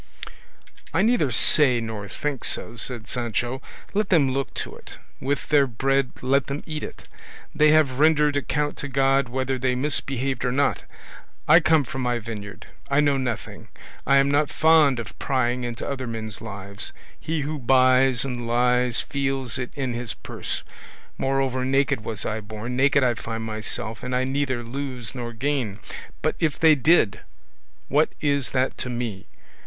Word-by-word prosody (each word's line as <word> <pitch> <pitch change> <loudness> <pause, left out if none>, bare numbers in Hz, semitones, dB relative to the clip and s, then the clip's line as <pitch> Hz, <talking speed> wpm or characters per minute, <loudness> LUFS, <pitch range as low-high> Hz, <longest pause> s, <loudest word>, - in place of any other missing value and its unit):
"I 190 - +4
neither 225 - +3
say 130 +1 +4
nor 110 -3 -5
think 145 -4 -3
so," 115 - -1
said 120 -1 -4
Sancho; 120 +1 -2 0.3
"let 210 0 0
them 145 -7 +4
look 135 +1 -2
to - - -5
it; - - -12 0.2
with 140 +1 -2
their 145 -2 +4
bread 135 +2 +1
let 135 +2 +2
them 140 +1 -4
eat 155 -1 -4
it; - - -9 0.5
they 155 0 +4
have 150 -4 +3
rendered 150 -1 +4
account 145 +1 -1
to 145 - -4
God 135 -1 +2
whether 130 +1 -2
they 130 0 +1
misbehaved 135 -2 -1
or 125 - +1
not; 140 +2 +1 0.6
I 155 +3 +8
come 160 -3 +3
from 130 +1 -5
my 125 -1 0
vineyard, 105 -3 -7 0.2
I 140 +1 +3
know 145 -2 +3
nothing; 125 -4 -4 0.4
I 140 - +5
am 140 0 +3
not 145 +1 +2
fond 155 -5 +4
of 115 - -8
prying 125 -2 0
into 120 -1 -4
other 130 -2 -3
men's 110 -3 -5
lives; 100 -2 -6 0.3
he 160 -1 -2
who 150 +1 -3
buys 130 0 +4
and 120 -3 -4
lies 125 0 +3
feels 135 -3 -2
it 125 - -3
in 130 -4 -2
his 120 -1 -2
purse; - - -3 0.6
moreover, 135 -1 0
naked 135 -2 +1
was 110 -4 -4
I 110 +1 -2
born, 110 +3 -6
naked 140 +1 +3
I 125 -1 +3
find 115 0 -5
myself, 110 0 -5
I 125 0 0
neither 130 -2 -1
lose 125 -2 -5
nor 120 -2 -5
gain; 125 -4 -2 0.5
but - - +1
if 155 -3 0
they 160 -1 +7
did, 150 - +3 0.7
what 150 +3 +3
is 140 -3 0
that 130 0 -1
to 125 - -3
me? 120 -6 -4
130 Hz, 165 wpm, -24 LUFS, 120-140 Hz, 0.7 s, I